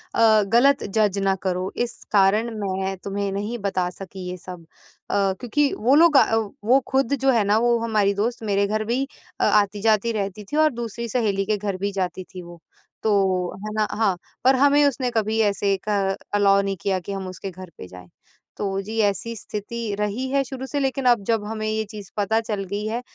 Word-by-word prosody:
अ, 220 -2 +5
गलत 265 +6 +4
जज 210 -3 +2
ना 195 0 +2
करो, 185 0 -1
इस 240 0 -3
कारण 210 +3 +3
मैं 190 -1 -2
तुम्हें 200 0 -2
नहीं 205 +4 -3
बता 185 -3 -1
सकी 185 0 -9
ये 180 - -5
सब 180 -1 -10 0.5
अ, - - -2 0.3
क्योंकि 280 +4 +1
वो 245 +6 +3
लोग 320 -1 +6
अ, 225 - +4 0.3
वो 255 +4 +5
खुद 265 -1 +1
जो 270 0 +4
है 230 -4 +3
ना 205 +2 +3
वो 240 0 +3
हमारी 215 -3 +1
दोस्त 235 +1 -2
मेरे 200 -1 +1
घर 215 +1 -1
भी 240 +4 0 0.4
अ, - - +3
आती-जाती 210 +2 +2
रहती 200 -1 -3
थी 295 - -1
और 310 0 +4
दूसरी 235 0 -5
सहेली 205 -4 0
के 215 +1 0
घर 200 -2 -3
भी 200 +2 -2
जाती 185 -1 -2
थी 180 - -6
वो। 170 -1 -13 0.4
तो 190 -4 +1
है 215 - -5
ना 215 -1 +1
हाँ, 200 -5 +2 0.3
पर 260 +2 +5
हमें 285 +2 +4
उसने 255 -2 -1
कभी 220 +1 0
ऐसे 200 0 0
क 195 -2 +1 0.2
अलाउ 200 -1 +4
नहीं 195 0 -2
किया 190 0 0
कि 185 +3 -8
हम 195 -1 -5
उसके 185 +1 -7
घर 185 0 -10
पे - - -9
जाएँ। 90 0 -13 0.5
तो 195 -1 -2
जी, 215 +3 -6
ऐसी 215 +2 0
स्थिति 215 +1 -5
रही 210 +5 -1
है 275 +1 +2
शुरू 265 0 -7
से 285 - -2
लेकिन 270 -1 -1
अब 240 -4 +4
जब 225 -1 +1
हमें 215 0 -4
ये 220 0 0
चीज़ 205 -4 -9
पता 210 +2 +2
चल 215 -3 -3
गई 205 +1 -2
है, 230 +2 -2
210 Hz, 205 wpm, -23 LUFS, 195-235 Hz, 0.5 s, लोग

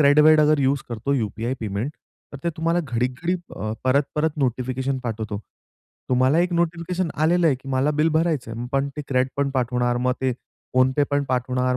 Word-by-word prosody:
CRED-वेड 150 +2 +6
अगर 150 0 +4
यूज 135 +1 +2
करतो 120 +4 -2
UPI 115 +1 -2
payment, 110 +4 -2 0.4
तर 140 - -7
ते 170 - +1
तुम्हाला 165 +2 +1
घडीक 125 -1 -1
घडी 175 +2 +1 0.2
अ, 110 +2 -3
परत-परत 145 +4 +1
नोटिफिकेशन 130 +1 -1
पाठवतो. 110 -2 -3 0.7
तुम्हाला 130 +4 +3
एक 175 +1 +1
नोटिफिकेशन 170 +1 -1
आलेलं 165 +3 +3
आहे, 150 - +4
की 135 +1 -12
मला 130 +2 +2
बिल 160 - +4
भरायचंय, 150 -9 -1 0.2
पण 140 0 +1
ते 150 - -3
CREDपण 130 +2 +1
पाठवणार, 125 -1 +1
मग 125 +1 +1
ते 130 -1 +1 0.4
PhonePe 130 +3 +4
पण 145 0 +2
पाठवणार, 125 0 0
135 Hz, 170 wpm, -23 LUFS, 125-150 Hz, 0.7 s, CRED-वेड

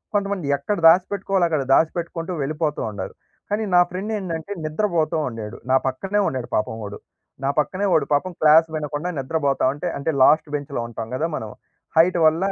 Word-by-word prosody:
కొంతమంది 200 -5 -1
ఎక్కడ 205 +9 -2
దాసి 180 +3 +6
పెట్టుకోవాలో 195 -2 +1
అక్కడ 155 -4 0
దాసి 160 +3 +5
పెట్టుకుంటూ 170 +1 -4
వెళ్ళిపోతూ 150 +1 -2
ఉండారు. 100 -2 -6 0.4
కానీ, 210 +2 0
నా - - +8
ఫ్రెండ్ 195 +4 -4
ఏందంటే 170 -1 -5
నిద్రబోతూ 165 0 0
ఉండేడు. 115 -1 -7
నా - - +5
పక్కనే 195 +11 -1
ఉండాడు 130 -2 -3
పాపం 110 +1 -1
వాడు. 100 0 -6 0.5
నా 135 - +1
పక్కనే 185 +6 0
వాడు - - +3
పాపం 165 +6 +1
క్లాస్ 155 +1 +6
వినకుండా 150 +2 -3
నిద్రబోతా 140 0 0
ఉంటే, 145 - -5
అంటే 140 +3 -1
లాస్ట్ 155 +3 +5
బెంచ్‌లో 140 -3 -4
ఉంటాం 115 -1 -6
గదా! 155 +5 0
మనం. 110 - -6 0.5
హైట్ 175 +2 +5
వల్లా, 165 +5 +3
160 Hz, 175 wpm, -22 LUFS, 140-185 Hz, 0.5 s, నా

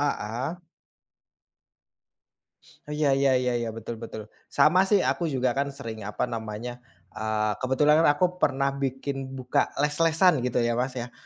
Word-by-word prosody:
Heeh. 140 +5 -2 2.3
Oh, - - -5
iya, 145 -3 +2
ya 135 -1 +3
ya 125 -1 0
ya 115 - -2
betul 115 0 -6
betul. 110 -2 -7 0.2
Sama 185 +5 +4
sih, 205 -3 +3
aku 170 -2 0
juga 130 -3 0
kan, 140 +2 -1
sering 115 -5 -7
apa 105 +3 -3
namanya, 115 +1 -5 0.3
e 110 - -6 0.4
kebetulan 145 +4 +3
kan, - - +6
aku 180 +2 0
pernah 140 0 +1
bikin 135 0 -4
buka 125 -1 0
les-lesan 160 +2 +3
gitu 125 -1 0
ya 120 - +1
Mas, 125 +2 -2
ya. 120 0 -5
130 Hz, 150 wpm, -26 LUFS, 120-150 Hz, 2.3 s, kan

